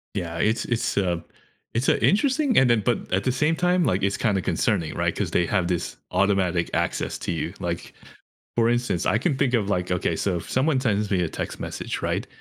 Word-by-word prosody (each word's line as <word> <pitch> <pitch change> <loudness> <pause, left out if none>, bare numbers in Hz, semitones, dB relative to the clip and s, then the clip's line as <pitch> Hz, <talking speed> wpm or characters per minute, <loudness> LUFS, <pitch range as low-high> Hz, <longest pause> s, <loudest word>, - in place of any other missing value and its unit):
Yeah, 85 -4 -3
it's 110 +5 +1
it's, 120 0 -1
uh 90 -4 0 0.5
It's, 120 +4 0
uh, - - +5
interesting, 265 +5 +3
and 135 - +5
then 115 -3 +3
but 120 - -1
at 95 - +1
the 130 - +2
same 150 +5 +1
time, 180 +1 +2
like, 100 -4 +1
it's 100 +1 0
kinda 100 -5 +1
concerning, 80 -2 0
right, - - -1
'cause - - -1
they 85 - +2
have 95 -4 0
this 90 -2 -2
automatic 95 -4 +1
access - - -1
to - - -2
you, 80 -3 -3
like - - -4 0.6
for 115 -1 +4
instance, 120 -8 0
I 105 - +3
can 140 +3 0
think 130 -2 +1
of, 105 -5 +1
like 90 -2 -1
Okay, 85 -2 0
so 95 0 0
if - - -9
someone 135 +1 +2
sends 105 -5 0
me 95 -2 +2
a 85 - 0
text - - -5
message, - - -4
right, - - -1
105 Hz, 220 wpm, -24 LUFS, 90-130 Hz, 0.6 s, uh